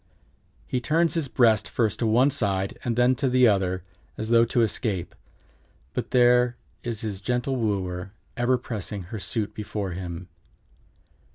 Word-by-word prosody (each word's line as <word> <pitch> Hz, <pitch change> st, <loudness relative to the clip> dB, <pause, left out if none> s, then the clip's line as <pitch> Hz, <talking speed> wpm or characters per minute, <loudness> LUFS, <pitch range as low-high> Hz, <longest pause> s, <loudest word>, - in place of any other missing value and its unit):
He 125 Hz, -, -2 dB
turns 165 Hz, +5 st, +2 dB
his 165 Hz, -4 st, -1 dB
breast 115 Hz, -5 st, +3 dB
first 110 Hz, -4 st, 0 dB
to 115 Hz, -, +1 dB
one 125 Hz, +6 st, +4 dB
side, 100 Hz, -7 st, -1 dB
then 125 Hz, +1 st, +3 dB
to 140 Hz, -2 st, +1 dB
the 125 Hz, 0 st, +5 dB
other, 95 Hz, -4 st, +1 dB, 0.3 s
as 110 Hz, -, -3 dB
though 115 Hz, 0 st, +5 dB
to 120 Hz, 0 st, +2 dB
escape, 105 Hz, -4 st, -1 dB, 0.8 s
but -, -, -3 dB
there 125 Hz, -1 st, +4 dB, 0.3 s
is 115 Hz, -1 st, -4 dB
his 105 Hz, -4 st, -4 dB
gentle 125 Hz, +4 st, -1 dB
wooer 95 Hz, -5 st, -2 dB, 0.2 s
ever 125 Hz, 0 st, +2 dB
pressing 105 Hz, -5 st, -5 dB
her 110 Hz, -, -3 dB
suit 105 Hz, +2 st, -3 dB
before 105 Hz, -2 st, -4 dB
him. 90 Hz, 0 st, -6 dB
115 Hz, 150 wpm, -25 LUFS, 100-125 Hz, 0.8 s, the